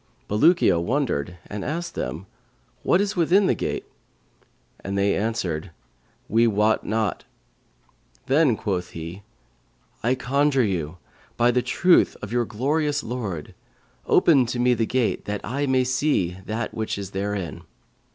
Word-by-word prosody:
Bulukiya 130 - +4
wondered 100 - -1
and 100 -1 -6
asked 170 +3 -3
them, 75 +9 -4 0.6
'What 175 - +3
is 205 +1 0
within 180 +3 +4
the - - +3
gate?'; - - -3 1.0
and 100 0 -3
they 100 0 +2
answered, 95 -6 -2 0.6
'We 115 +2 +3
wot 105 0 +2
not.' 110 -2 -1 1.0
Then 135 -4 +3
quoth 90 -4 -2
he, 85 +4 -7 0.8
'I 125 +3 +2
conjure 135 +1 +2
you, 90 -5 -2 0.4
by 120 +1 +4
the 125 +1 +2
truth 180 +7 +3
of - - -6
your 120 0 +1
glorious 145 +6 0
Lord, 105 -10 -5 0.5
open 140 -7 +5
to 125 - -3
me 125 +1 +3
the 115 -2 0
gate, 125 -3 0
that 105 -1 -3
I 140 +6 -2
may 130 -1 +3
see 125 - 0
that 110 +1 -3
which 110 -2 -3
is 100 -1 -6
therein.' 100 -2 -3
115 Hz, 140 wpm, -24 LUFS, 100-135 Hz, 1.0 s, open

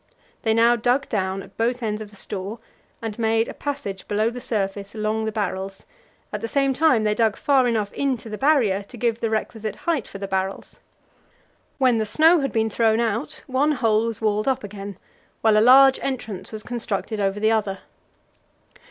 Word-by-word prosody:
They 220 -1 +1
now 235 +1 +5
dug 245 +4 +1
down 190 -2 -1
at - - -16
both 240 +2 0
ends 215 -1 -2
of 210 - -7
the 205 - -17
store, 200 +2 -5 0.5
and 225 0 -5
made 225 0 +2
a - - -6
passage 240 -10 -5
below 215 +2 +1
the 245 +1 -7
surface 200 -2 -3
along 215 +1 -1
the 220 - -1
barrels; 195 -2 -4 0.5
at 210 - -3
the 230 - -2
same 275 +2 +1
time 265 -5 +3
they 210 0 +2
dug 220 -1 +2
far 270 -3 +3
enough 215 -4 -1
into 265 -5 -1
the 215 -1 -6
Barrier 260 -9 +3
to 205 +5 -13
give 230 -1 0
the 225 - -1
requisite 220 0 -3
height 320 -9 -1
for - - -9
the 195 0 -5
barrels. 190 0 -3 1.0
When 255 -4 +3
the 215 - -1
snow 320 +9 +5
had 275 -1 -1
been 220 -1 0
thrown 225 0 +2
out, 235 +6 -2
one 280 +3 +1
hole 225 -4 +2
was 230 -2 -4
walled 215 +1 +1
up 265 -4 +1
again, 200 -2 -7 0.4
while 220 -1 +4
a 215 - +5
large 265 +3 +7
entrance 230 -8 -4
was 215 -1 -6
constructed 225 -2 -3
over 195 0 0
the 220 +1 +3
other. 210 -3 0
220 Hz, 195 wpm, -23 LUFS, 205-245 Hz, 1.0 s, large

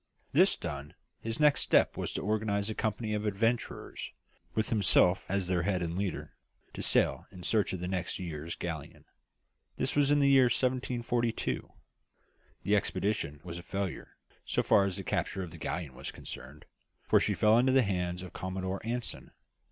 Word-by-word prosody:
This - - +5
done, 70 +1 -6 0.2
his 115 0 -4
next 150 -1 +4
step - - +3
was - - -3
to - - -3
organise 105 -1 0
a - - -1
company 110 0 -2
of 105 0 -1
adventurers, 115 +4 -1 0.5
with 110 - +1
himself 95 -4 +4
as 95 -1 0
their 90 -1 +1
head 90 0 0
and 85 0 -3
leader, 95 -2 -3 0.4
to - - -5
sail - - +2
in 90 - -11
search 105 +2 +2
of 95 - -4
the 90 - -2
next 90 -1 -2
year's 85 -3 -5
galleon. 80 -4 -6 0.7
This - - -1
was 145 -1 +4
in 145 0 +4
the 140 - +4
year 135 -2 +7
1742. 120 -2 0 0.9
The 105 - +3
expedition 100 -7 -1
was 85 -1 -6
a - - -8
failure, 95 0 -4 0.3
so - - 0
far 100 - +5
as 95 -2 -2
the 95 - -5
capture 95 +1 -1
of 85 - -7
the 85 - -10
galleon 80 -4 -3
was - - -6
concerned, 70 +3 -9 0.4
for - - +5
she - - +1
fell 110 +2 +5
into 130 +2 +4
the 130 0 +5
hands 90 -3 -2
of 90 - -9
Commodore 95 +1 -3
Anson. 120 +2 -3
100 Hz, 175 wpm, -31 LUFS, 90-115 Hz, 0.9 s, year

